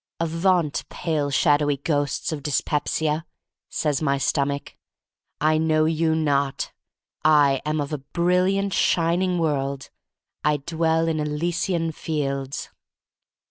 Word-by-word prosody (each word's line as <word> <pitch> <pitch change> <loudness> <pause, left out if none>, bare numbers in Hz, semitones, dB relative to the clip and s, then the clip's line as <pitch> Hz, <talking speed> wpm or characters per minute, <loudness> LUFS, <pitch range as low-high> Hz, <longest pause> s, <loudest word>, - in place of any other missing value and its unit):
" - - -67
Avaunt, 165 -1 +1
pale, 155 -4 -1
shadowy 145 +1 +3
ghosts 145 0 -1
of 155 -2 -4
dyspepsiaf* 150 +2 0 0.5
says 150 -2 -1
my 140 -2 +1
Stomach. 140 +1 -1 0.6
"I 155 +1 +3
know 155 -1 +2
you 160 0 +1
not. 140 -3 0 0.5
I 145 -3 +4
am 155 0 0
of 145 +1 -3
a 150 - -2
brilliant, 180 +6 +1
shining 175 +2 +2
world. 140 -4 -1 0.5
I 150 0 +3
dwell 165 +2 0
in 160 -1 0
Elysian 165 +3 -1
fields." 140 -4 -3
155 Hz, 115 wpm, -24 LUFS, 145-165 Hz, 0.6 s, I